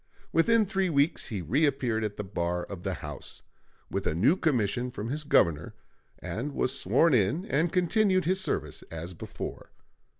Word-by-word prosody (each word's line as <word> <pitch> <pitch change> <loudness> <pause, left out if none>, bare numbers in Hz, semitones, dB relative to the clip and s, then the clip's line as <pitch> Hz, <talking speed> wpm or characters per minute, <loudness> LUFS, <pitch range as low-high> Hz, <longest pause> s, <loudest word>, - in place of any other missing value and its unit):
Within 220 +7 +4
three 190 -1 0
weeks 145 +1 +1
he 100 -5 -4
reappeared 130 - +1
at 105 -1 -3
the 105 - -3
bar 90 -2 -2
of 95 -3 -8
the 95 0 -2
House, 75 -2 -7 0.5
with - - -1
a 80 - 0
new 125 - +4
commission 125 - 0
from 115 -2 -5
his 150 +3 -2
Governor, 85 - +2 0.4
and 140 +6 -4
was 130 0 0
sworn 165 -2 +3
in 130 - +2
and 160 -1 +1
continued 185 +1 +2
his 185 +2 +1
service - - -2
as 85 +2 -6
before. 85 - -7
130 Hz, 165 wpm, -28 LUFS, -, 0.5 s, Within